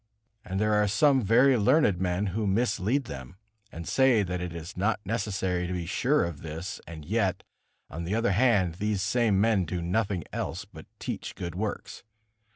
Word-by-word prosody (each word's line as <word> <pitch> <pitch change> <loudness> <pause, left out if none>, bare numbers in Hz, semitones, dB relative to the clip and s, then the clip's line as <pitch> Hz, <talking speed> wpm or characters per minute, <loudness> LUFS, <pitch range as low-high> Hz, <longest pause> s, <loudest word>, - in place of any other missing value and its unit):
And 95 +1 -3
there 105 0 +2
are 105 0 +3
some 135 +6 +4
very 125 +6 +5
learned 105 - +3
men, 90 +2 0
who 110 0 -1
mislead 115 +4 +1
them, 65 - -8 0.4
and 85 0 -8
say 130 -5 +4
that 90 -1 -3
it 90 -1 -4
is 85 0 -8
not 100 +4 0
necessary 95 -4 -1
to 90 - -3
be 90 -2 -3
sure 130 - +1
of 85 -4 -6
this; 80 +3 -6
and 80 -3 -9
yet, 100 0 0 0.4
on 80 +3 -6
the 90 +5 -2
other 115 -3 +1
hand, 100 -6 +2
these 105 -2 0
same 110 -2 +2
men 105 -2 +3
do 90 +1 -3
nothing 95 +1 -1
else - - -3
but - - -13
teach - - -5
good 85 -2 -5
works. 100 +3 -4
100 Hz, 180 wpm, -28 LUFS, 90-115 Hz, 0.4 s, very